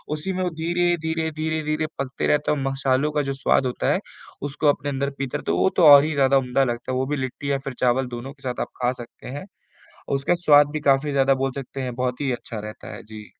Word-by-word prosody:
उसी 185 +5 -4
में 185 - -2
वो 180 - 0
धीरे-धीरे, 165 -1 0
धीरे-धीरे 155 0 -1
पकते 135 -1 -2
रहते 150 0 +2
हैं 150 - +1
और 135 - -3
मसालों 135 +2 +1
का 150 -1 +1
जो - - 0
स्वाद 135 -1 +2
होता 125 - 0
है, - - 0 0.5
उसको 150 +2 -1
अपने 145 0 0
अंदर 140 0 -1
पीते 135 -2 -3
रहते - - -3
है। 85 - +1
वो 95 +1 +3
तो 175 - +4
और 145 -1 +10
ही 155 0 -1
ज़्यादा 135 -1 +4
उम्दा 135 +1 +1
लगता 120 0 -3
है, - - -1
वो 130 - 0
भी 145 +1 -2
लिट्टी 130 +2 -3
या 140 - +2
फिर 135 - -3
चावल 125 +1 +2
दोनों 130 +3 -7
के 140 - -28
साथ 125 -1 -3
आप - - -4
खा 125 0 +2
सकते 120 - -12
हैं। 185 - -7 0.7
उसका 140 +6 +1
स्वाद 145 -1 +6
भी 155 - -2
काफ़ी 140 +1 +2
ज़्यादा 135 0 +3
बोल 135 - -1
सकते 135 0 -5
हैं 125 -2 -4
बहुत 125 +1 -2
ही 135 -3 0
अच्छा 115 -2 -6
रहता 105 0 -8
है, - - -9
जी। 105 0 -11
140 Hz, 250 wpm, -23 LUFS, 130-150 Hz, 0.7 s, और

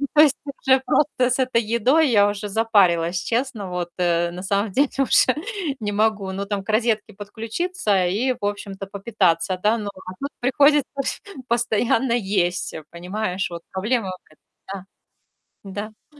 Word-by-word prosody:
то 300 - +8
есть 300 -2 +5 0.3
уже, 265 -1 +5
просто 255 -4 +2
с 255 +1 0
этой 255 -2 +2
едой 245 +8 +3
я 205 -4 +5
уже 205 0 -3
запарилась, 190 -5 +2
честно. 230 -5 -2
Вот, 180 -1 -3
э, 170 -1 +1
на 180 +1 -7
самом 200 +1 0
деле 280 +6 +2
уже 260 -1 +4 0.4
не 210 -2 -2
могу, 205 -2 0
ну 195 +1 -4
там 200 -1 -2
к 200 - -15
розетке 220 -1 +1
подключиться 220 - -1
и, 220 +9 +1
в - - -3
общем-то, 200 -1 -4
попитаться, 190 -4 0
да, 215 +3 +3
но 210 -2 -4
а 185 -1 -10
тут 280 - -2
приходится 280 +2 +3 0.6
постоянно 235 +1 +1
есть, 190 -5 0
э, 160 - -7
понимаешь, 185 +3 -3
вот 170 -1 -7
проблема 210 +2 -1
в 185 0 -13
этом. 195 -1 -7 0.8
Да. 205 +2 -6 0.2
Да. 295 - -20
210 Hz, 160 wpm, -22 LUFS, 190-240 Hz, 0.8 s, то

